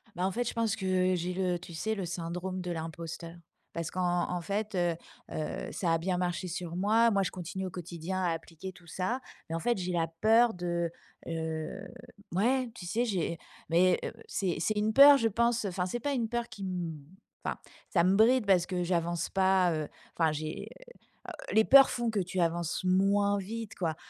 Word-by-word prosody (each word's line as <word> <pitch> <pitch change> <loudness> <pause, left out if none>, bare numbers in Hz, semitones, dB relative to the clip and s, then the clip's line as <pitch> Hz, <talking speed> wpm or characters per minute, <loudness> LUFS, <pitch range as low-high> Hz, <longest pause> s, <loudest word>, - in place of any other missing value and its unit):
Bah, 180 +2 0
en - - -1
fait, 240 +2 -1
je - - -2
pense 225 -2 0
que 185 -1 +1
j'ai 180 +1 -2
le, 180 -1 0
tu 170 0 -11
sais? 220 +7 -1
Le 190 -3 -3
syndrome 180 +2 -4
de 180 -1 -4
l'imposteur 165 +1 -6 0.4
parce 165 -1 -3
qu'en 180 -1 0
en 180 0 -1
fait, 205 +3 -3
heu 175 -2 +1 0.4
heu, 155 - -4
ça 170 -3 0
a - - +3
bien 180 +2 -1
marché 180 +1 -1
sur 175 0 -5
moi. 220 +5 +4
Moi, 200 -2 +2
je - - -2
continue 185 +1 -5
au 185 - -5
quotidien 175 +2 -4
à 175 - +2
appliquer 165 +3 -7
tout 175 -1 -18
ça, 185 +9 -2 0.3
mais 165 - -2
en - - -1
fait, 240 +1 0
j'ai 180 0 -2
la 170 -2 +1 0.2
peur 225 +2 +5
de 170 -1 -2 0.4
heu, 160 +2 -4 0.5
ouais, 250 +6 +2
tu 175 - -8
sais? 230 +8 0
J'ai 175 -6 -1 0.3
mais 180 +2 +4
heu, - - -3 0.2
c'est 185 -5 -1
c'est 210 +5 0
une 215 +1 +1
peur 280 +2 +10
je 230 - +2
pense, 235 +1 +1
enfin, 185 -1 -1
c'est 240 +6 -3
pas 285 +3 -1
une 230 -4 -1
peur 240 0 -2
qui 215 -3 -10
m 175 -5 -3 0.4
enfin, - - -2 0.3
ça 170 -4 +3
me 190 +2 +4
bride 230 +2 +5
parce 180 -3 +3
que 180 -2 -1
j'avance 170 -1 -1
pas, 190 -2 +3
heu, 155 -1 -2 0.3
enfin 160 -2 +3
j'ai, 155 +1 -5 0.6
heu, - - -5 0.2
les 220 - +7
peurs 275 0 +8
font 240 -2 -1
que 210 - 0
tu 185 0 -2
avances 170 +1 0
moins 200 +2 +3
vite, 220 +2 -6
quoi 165 -5 -1
185 Hz, 205 wpm, -30 LUFS, 170-210 Hz, 0.6 s, peur